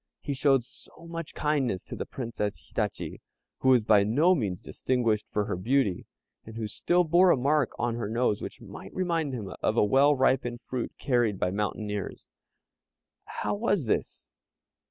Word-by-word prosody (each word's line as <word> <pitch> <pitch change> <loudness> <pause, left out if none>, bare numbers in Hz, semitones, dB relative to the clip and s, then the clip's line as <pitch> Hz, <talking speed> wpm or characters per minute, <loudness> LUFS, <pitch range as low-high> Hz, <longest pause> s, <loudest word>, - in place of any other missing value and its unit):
He 145 - -3
showed 135 -3 +3
so 135 - -14 0.2
much 165 -1 -6
kindness 140 -10 0
to - - -8
the - - -5
Princess 115 -5 -4
Hitachi, - - -3 0.4
who 130 - +2
was 125 -4 +5
by 105 -2 +5
no 145 - +4
means 105 - -2
distinguished 115 -5 -1
for 105 -1 -1
her - - -2
beauty, 105 0 0 0.4
and 110 - -11
who 110 -2 -2
still 175 +11 +1
bore 175 +3 +5
a 175 - +5
mark 140 +1 +2
on 120 -1 0
her 115 -3 -3
nose 115 -2 +1
which - - -7
might 95 - -10
remind 165 -7 -1
one 95 - -7
of 110 - 0
a - - +5
well 140 +7 +4
ripened 130 -2 +1
fruit 125 -2 -4
carried 120 -6 +1
by 90 - 0
mountaineers. 105 0 -3 1.0
How - - -3
was 205 - 0
this? 110 - -2
125 Hz, 170 wpm, -28 LUFS, 105-145 Hz, 1.0 s, was